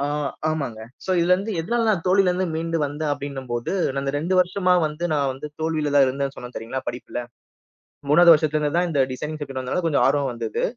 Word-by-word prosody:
ஆ, 140 - 0 0.4
ஆமாங்க. 140 -8 -3 0.2
சோ - - -3
இதுல 175 +2 +3
இருந்து 200 +4 -3
எதனால 230 +7 0
நான் 195 -6 +1
தோல்வில 185 0 +4
இருந்து 185 +1 0
மீண்டு 165 +1 -1
வந்த 145 +2 -5
அப்டின்னம்போது 135 -4 -4 0.2
நான் 135 0 -2
இந்த 135 0 -2
2 170 +5 -1
வருஷமா 180 0 +2
வந்து 150 +3 -5
நான் 140 -3 +1
வந்து 135 +3 -7
தோல்விலதான் 150 -3 +2
இருந்தேன் 135 +1 -2
சொன்னேன் 125 0 -9
தெரியுங்களா 125 +4 -5
படிப்புல. 120 0 -6 0.9
3வது 170 +3 +8
வருஷத்துல 155 -1 +2
இருந்துதான் 165 +4 +1
இந்த 145 -4 +1
டிசைனிங் 150 +4 -5
சப்ஜெக்ட் 135 -2 -5
வந்ததால 150 +8 -2
கொஞ்சம் 150 -3 +2
ஆர்வம் 140 -1 +1
வந்தது. 115 -2 -3
150 Hz, 190 wpm, -23 LUFS, 135-170 Hz, 0.9 s, 3வது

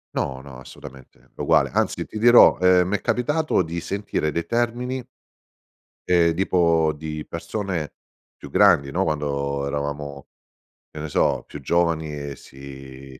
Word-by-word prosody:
No, 65 -1 -2
no, 65 -2 -11
assolutamente 65 0 -14
è - - -28
uguale - - +3
anzi, - - 0
ti - - -9
dirò, 120 +2 +7
ehm, 90 0 +4
mi 105 - 0
è - - -3
capitato 150 -1 0
di 85 0 -4
sentire 100 -6 -2
dei 85 +2 -3
termini 120 +4 -2 1.0
ehm, 85 -2 +4
tipo 85 -3 +2
di 75 0 -6
persone 90 -2 -4 0.4
più - - -12
grandi, 70 -1 +4
no, 95 +6 0
quando 70 -3 -2
eravamo, 70 0 -5 0.6
che 75 - -9
ne 80 - -5
so, - - +1
più 75 - -9
giovani 80 +1 0
e 70 -1 -6
si 65 -1 -12
80 Hz, 145 wpm, -23 LUFS, 70-90 Hz, 1.0 s, dirò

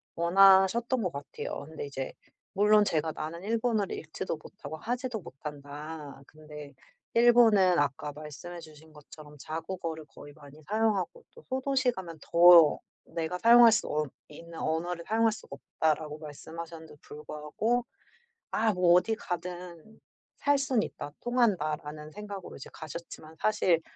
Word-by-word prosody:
원하셨던 195 +7 +5
것 180 - -1
같아요. 140 0 -6
근데 160 -2 -6
이제 135 -1 -5 0.4
물론 210 +1 +5
제가 160 -2 0
나는 160 +3 -6
일본어를 225 -2 0
읽지도 160 +2 -5
못하고 155 0 -10
하지도 245 +4 -3
못한다. 145 0 -9
근데 150 -2 -11 0.4
일본은 225 -7 +6
아까 145 +1 -1
말씀해 155 +4 -9
주신 155 -1 -15
것처럼 150 0 -14
"자국어를 165 +1 -5
거의 145 -1 -13
많이 145 +1 -15
사용하고 220 - 0
또 470 - -15
소도시에 265 0 +1
가면 170 -4 -8
더 170 -2 +7 0.3
내가 165 +2 -3
사용할 235 +1 +8
수 215 - +1
없 150 -2 -2 0.2
있는 165 +2 -11
언어를 170 +2 -2
사용할 225 +1 +3
수가 175 -9 -9 0.2
없다."라고 155 -1 0
말씀하셨는데도 160 +1 -9
불구하고 150 +11 -3 0.7
'아 220 0 +2
뭐 180 -2 +4
어디 200 +5 +3
가든 180 0 -7 0.4
살 285 0 +3
순 265 -5 +1
있다. 145 - -6
통한다.'라는 155 -11 -1
생각으로 205 -2 -8
이제 135 - -10
가셨지만 160 0 -9
사실 185 -6 +2
170 Hz, 320 characters per minute, -29 LUFS, 155-215 Hz, 0.7 s, 사용할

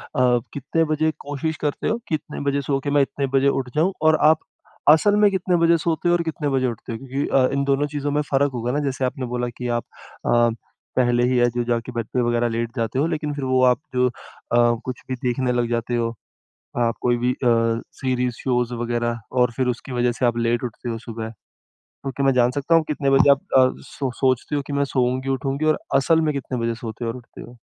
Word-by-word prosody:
अ, 125 -1 +3
कितने 155 +4 0
बजे 155 +1 +1
कोशिश 145 +2 -3
करते 145 - -1
हो 225 - +1
कि 160 - +1
इतने 150 0 -7
बजे 140 0 0
सो 135 0 -1
के 145 - -2
मैं - - +6
इतने 140 0 -1
बजे 135 - +3
उठ 135 -2 -1
जाऊँ, 175 +5 +2
और 155 0 +5
आप 160 - +4 0.5
असल 160 +7 +6
में 210 -1 +5
कितने 185 -1 0
बजे 170 0 +4
सोते 165 +1 0
और 175 0 +3
कितने 160 -2 -2
बजे 130 -1 +1
उठते 120 0 -6
हो? 115 - -3
क्योंकि 135 +3 -3
अ, 130 -1 +3
इन 140 0 +1
दोनों 140 +1 +1
चीज़ों 145 0 -2
में 150 - +1
फ़र्क 140 +1 +3
होगा 120 0 -2
ना। 145 - 0
जैसे 130 0 -2
आपने 130 0 -3
बोला 125 0 -1
कि 125 - -4
आप 120 - -4 0.5
अ, 120 0 +4 0.5
पहले 120 -1 +3
ही 130 - +2
है 120 0 +4
जो 120 +1 -2
जाके 120 0 -1
बेड 115 -2 -3
पे 125 - +2
वग़ैरह 120 0 +1
लेट 115 +1 -3
जाते 115 +1 -1
हो, 150 - +3
लेकिन 150 -3 -2
फिर 145 -2 -5
वो 130 0 +2
आप - - -29 0.2
जो 125 0 +4
अ, - - -9 0.7
कुछ 130 -1 -5
भी 130 - -1
देखने 125 +1 0
लग 120 -1 0
जाते 120 0 -1
हो, 115 -1 -1 0.7
आप 115 -1 +1
कोई 120 -1 +2
भी 125 +1 +1
अ, 125 - -5 0.5
सीरीज़, 125 -2 -1
शोज़ 125 -2 0
वग़ैरह, 120 0 -2
और 125 -1 +2
फिर 130 -1 +1
उसकी 125 +2 -3
वजह 120 0 +2
से 125 - -1
आप 120 -1 +1
लेट 120 +1 0
उठते 120 0 -5
हो 115 - -3
सुबह। 115 -1 -6 0.7
तो 135 - -3
क्या 140 +1 -2
मैं 135 - +4
जान 125 -1 +3
सकता 145 +5 +1
हूँ, 165 - +4
कितने 140 -2 0
बजे 135 +1 +5
आप 140 - +3 0.2
अ, 130 -1 +6 0.2
सो 135 -3 -3
सोचते 130 +2 +1
हो 145 - 0
कि 145 - -4
मैं 140 0 +1
सोऊँगी, 130 +1 0
उठूँगी 135 +2 -1
और 155 0 +2 0.2
असल 160 +4 +4
में 155 -1 +1
कितने 135 -2 -4
बजे 115 0 -1
सोते 115 +1 -5
और 115 - -2
उठते 125 -2 -12
हो? 120 +1 -12
130 Hz, 235 wpm, -22 LUFS, 120-145 Hz, 0.7 s, मैं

